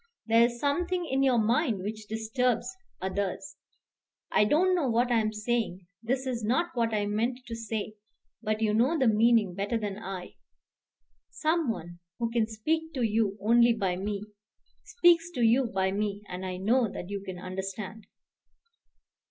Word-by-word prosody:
There 230 0 +4
is 240 0 +2
something 350 +6 0
in 270 -3 0
your 260 -3 +4
mind 230 - +1
which 215 +1 -5
disturbs 230 - -1 0.3
others. 195 +8 -3 0.7
I 210 - +4
don't 355 - +3
know 325 -8 +1
what 240 +2 +2
I 235 - +4
am 215 -1 0
saying. 215 -4 -2 0.2
This 255 +3 -1
is 245 -3 -3
not 265 +11 +1
what 230 -2 +1
I 210 -1 0
meant 230 +5 -1
to 230 - -6
say; 220 -2 -4 0.5
but 215 +1 -1
you 210 -1 +2
know 255 +9 +3
the 265 - +2
meaning 220 -3 +4
better 200 +5 -1
than 205 -2 -4
I. 190 -4 -7 0.9
Some 320 -2 0
one 175 -5 -5 0.2
who 230 -1 -2
can 230 -2 +1
speak 320 +9 -2
to 255 - 0
you 215 -2 +1
only 235 +3 +5
by 195 -5 -1
me 200 +2 -3 0.6
speaks 345 -5 +4
to 245 - -1
you 235 +3 +4
by 190 -3 0
me; 205 0 -2
and 185 +1 -5
I 185 0 -4
know 225 +5 +2
that 180 0 -7
you 200 -1 -4 0.2
understand." 190 +3 -6
225 Hz, 165 wpm, -28 LUFS, 205-250 Hz, 0.9 s, only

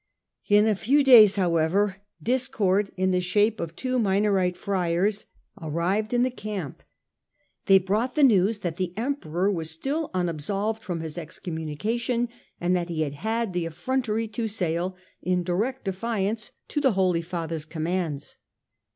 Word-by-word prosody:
In 205 +1 +6
a 220 - +3
few 250 +10 +2
days, 225 -7 +8
however, 185 +2 +1 0.3
discord 225 -6 +1
in 185 0 +2
the 180 - +2
shape 205 +4 +2
of 165 -1 -5
two 255 -1 -1
Minorite 195 -3 +2
friars 190 +2 0 0.3
arrived 175 +7 -1
in 245 0 +3
the 255 - +1
camp. 205 - -6 0.9
They 195 - +8
brought 210 +7 0
the 300 - +3
news 210 -3 +4
that 170 -2 -3
the 185 0 -3
Emperor 205 - -1
was 165 -4 -3
still 280 - -2
unabsolved 195 +6 -1
from 175 -6 -4
his 160 +1 -5
excommunication, 185 +10 -3 0.3
and 175 +1 +1
that 175 -1 -1
he 160 -2 0
had 145 -2 -4
had 220 +5 -2
the 175 -2 -1
effrontery 225 +5 -1
to 225 +1 -2
sail 180 -3 -2 0.3
in 180 0 0
direct 215 +9 -2
defiance 210 +2 -2 0.3
of 295 - +2
the 265 -5 +3
Holy 185 -3 +2
Father's 165 -2 -4
commands. 160 -2 -3
195 Hz, 150 wpm, -26 LUFS, 170-220 Hz, 0.9 s, days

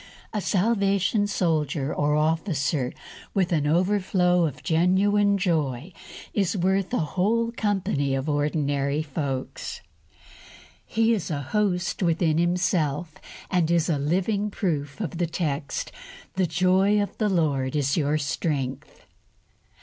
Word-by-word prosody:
A 210 - -1
Salvation 200 0 +1
Soldier 155 -6 0
or 150 0 +1
Officer 155 -4 0 0.4
with 185 -2 +1
an 150 -4 +1
overflow 180 0 +2
of 145 -1 -8
genuine 200 +5 +3
joy 160 -4 -1 0.4
is 200 0 0
worth 190 +1 +1
a 250 - +1 0.2
whole 230 +5 +1
company 190 - 0
of 135 +2 -3
ordinary 145 -1 0
folks. 140 -3 -4 1.1
He 225 +1 +2
is 205 -6 -2
a 145 -3 -2
host 190 -4 0
within 165 -2 +2
himself, 175 -3 0 0.4
and 175 -3 +2
is 170 0 +2
a 150 -4 +1
living 190 +8 0
proof 155 -7 -2
of 175 -5 -4
the 175 - +1
text, 150 -4 -3 0.4
"The 185 -1 +1
joy 185 +5 +3
of 205 - -2
the 215 -2 +2
Lord 145 -7 0
is 140 -2 +1
your 150 -1 +1
strength." 140 -2 -3
170 Hz, 125 wpm, -25 LUFS, 145-195 Hz, 1.1 s, genuine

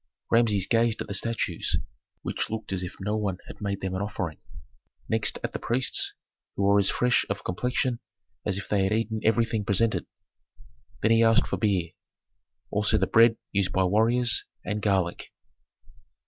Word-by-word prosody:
Rameses 110 -5 +3
gazed 115 0 +2
at - - -14
the 100 - -4
statues, 115 +3 -1 0.5
which - - -2
looked 110 -2 -4
as 95 - -2
if 90 +1 -6
no 105 +2 -2
one 100 -4 -1
had - - -12
made 100 -1 -3
them 95 -1 -3
an 95 - -2
offering; 95 -6 -4 0.7
next 110 -1 +1
at - - -3
the - - -3
priests, 125 +2 +1 0.4
who 100 - -1
were 100 +1 +5
as 100 - +2
fresh 125 0 +2
of 100 -1 -3
complexion 125 +5 -1 0.4
as 100 -2 0
if 100 - -6
they 100 -2 +1
had 95 - +1
eaten 110 0 -1
everything 110 -1 +2
presented; 110 +3 +1 1.0
then 110 - +4
he 115 0 +5
asked 115 0 +4
for - - -3
beer, 95 -6 0 0.8
also 105 +1 +2
the 95 - +2
bread 115 +3 +5
used 100 -2 +1
by 95 - +2
warriors, 115 +5 +3 0.2
and 105 0 -2
garlic. 95 -4 0
105 Hz, 170 wpm, -26 LUFS, 95-115 Hz, 1.0 s, were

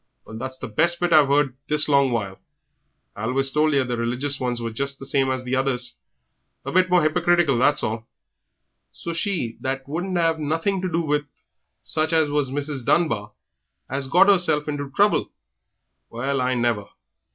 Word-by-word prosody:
Well, 110 - -10
that's 130 +1 -5
the - - -6
best 170 +11 +2
bit 175 -1 +1
I've 150 -3 +6
heard 140 -2 +2
this 150 0 +4
long 140 -3 +3
while. 100 -5 -3 0.8
I 105 - -5
always 135 +3 +1
told 155 +1 +2
ye 140 - +2
that 135 - +2
the 120 -1 -3
religious 125 +4 -2
ones 125 -2 -1
were 115 -1 -4
just 140 +4 -3
the 135 - -9
same 135 -1 +1
as 130 -1 -2
the 125 +1 -2
others 130 -2 -1 0.7
a 135 - -4
bit 185 +2 +3
more 180 -2 +4
hypocritical, 170 -4 +2
that's 145 +3 +2
all. 110 +1 -3 0.8
So 170 - -6
she 165 - -1
that 135 0 -3
wouldn't 175 +5 -3
'ave 165 -2 +1
nothing 165 +6 -1
to 185 -1 -3
do 165 0 +1
with 150 -2 -1 0.6
such 160 +1 -1
as 160 -2 +2
was 145 -2 0
Mrs. 140 -1 -4
Dunbar 115 -10 0 0.6
'as 135 0 -2
got 180 +7 +5
'erself 175 -7 +3
into 145 -2 -4
trouble! 205 +9 +2 0.8
Well 130 +3 -2
I 125 0 0
never! 120 -4 0
140 Hz, 185 wpm, -23 LUFS, 125-160 Hz, 0.8 s, I've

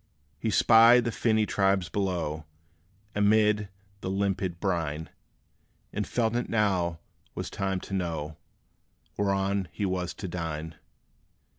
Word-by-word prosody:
He 115 - -1
spied 115 +3 +6
the 115 - 0
finny 110 0 +2
tribes 95 -3 +1
below, 85 -6 -2 0.7
Amid 105 0 +3 0.3
the 95 - -4
limpid 95 -2 -1
brine; 80 -5 -2 0.8
And - - -2
felt 115 -1 0
it 120 - -1
now 95 -6 +1 0.4
was - - -4
time 95 -1 -1
to - - -8
know 80 -5 -3 0.8
Whereon 100 -1 0
he 95 +4 -2
was 90 -2 -2
to 95 - -6
dine. 80 -2 -4
95 Hz, 120 wpm, -28 LUFS, 85-105 Hz, 0.8 s, spied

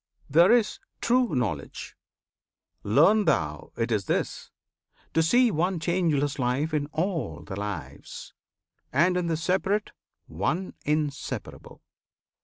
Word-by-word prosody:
There 170 +8 +5
is 235 -3 +2 0.2
"true" 245 - +2
Knowledge. 100 - -3 0.9
Learn 165 - +4
thou 75 - 0
it 115 +1 -1
is 105 -3 0
this: - - -2 0.6
To 160 - +3
see 240 +8 +4
one 175 +1 0
changeless 160 -5 0
Life 130 +6 0
in 145 -1 0
all 165 - -3
the 95 - -7
Lives, 100 -4 -7 0.6
And 170 +7 +3
in 180 -1 0
the 165 -1 0
Separate, 190 +5 0 0.3
One 150 - -2
Inseparable. 150 -1 -3
155 Hz, 115 wpm, -26 LUFS, 125-185 Hz, 0.9 s, There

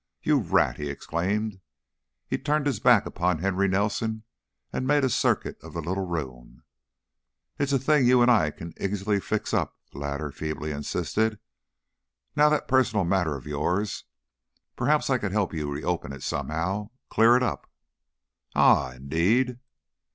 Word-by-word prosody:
"You - - +3
rat!" - - +2
he 75 -1 -4
exclaimed. 95 +8 -2 0.7
He - - -2
turned 150 +1 0
his 135 -8 0
back 120 -3 +5
upon 90 -1 0
Henry 95 +3 +1
Nelson 110 +3 -1 0.5
and 130 - -2
made 145 0 +3
a 130 - +2
circuit - - 0
of - - -11
the 85 - -4
little 95 +3 -2
room. 65 -8 -6 1.0
"It's 140 0 0
a 135 - +4
thing 135 0 +3
you 125 -1 +6
and 120 - +5
I 90 -11 +4
can 85 +2 -9
easily 100 +1 0
fix - - -3
up," - - 0
the 70 - -10
latter 70 +1 -3
feebly 75 +1 -4
insisted. 105 +9 -1 1.0
"Now 150 0 +5
that 150 -1 0
personal 125 -7 +2
matter 85 -4 +1
of 65 - -9
yours 90 +8 -2 0.7
Perhaps 145 +2 +1
I 130 - +3
could 105 -4 -3
help 105 -4 0
you 75 -3 -3
reopen 70 -1 -3
it 70 - -9
somehow, 95 +7 -2 0.2
clear 115 +2 +6
it 125 - 0
up." 125 - -3 0.9
"Ah! 65 -2 +4
Indeed!" 90 - +1
100 Hz, 155 wpm, -26 LUFS, 80-120 Hz, 1.0 s, you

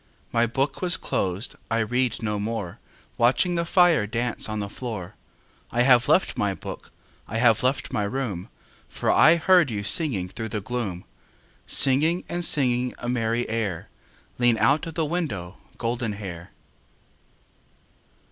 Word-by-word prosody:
My 115 0 +2
book 135 +4 -2
was 175 -4 +4
closed, 95 +5 -2 0.2
I 115 -1 +1
read 120 +1 -1
no 105 -1 -1
more, 105 -4 -4 0.4
Watching 125 +9 +3
the 170 0 0
fire 170 - +4
dance 115 +1 -2
On 110 - -3
the 100 -1 -3
floor. 105 -4 -6 0.6
I 120 - +1
have 125 -2 +5
left - - +2
my - - 0
book, - - -9 0.4
I 110 - -4
have 115 -2 +4
left 130 +1 -1
my - - 0
room, 105 -6 -4 0.4
For - - 0
I 160 +4 +6
heard 175 -2 +4
you 105 -3 -3
singing 115 - 0
Through 110 +4 -6
the 105 - -3
gloom. 105 -5 -4 0.6
Singing 155 +7 +3
and 175 0 -3
singing 125 -5 +1
A 120 - -6
merry 120 -1 0
air, 110 -7 -3 0.5
Lean 120 -2 +4
out 145 +8 +2
of 165 - -8
the 160 - 0
window, 115 - -3 0.2
Goldenhair. 105 -7 -4
120 Hz, 145 wpm, -25 LUFS, 105-135 Hz, 0.6 s, I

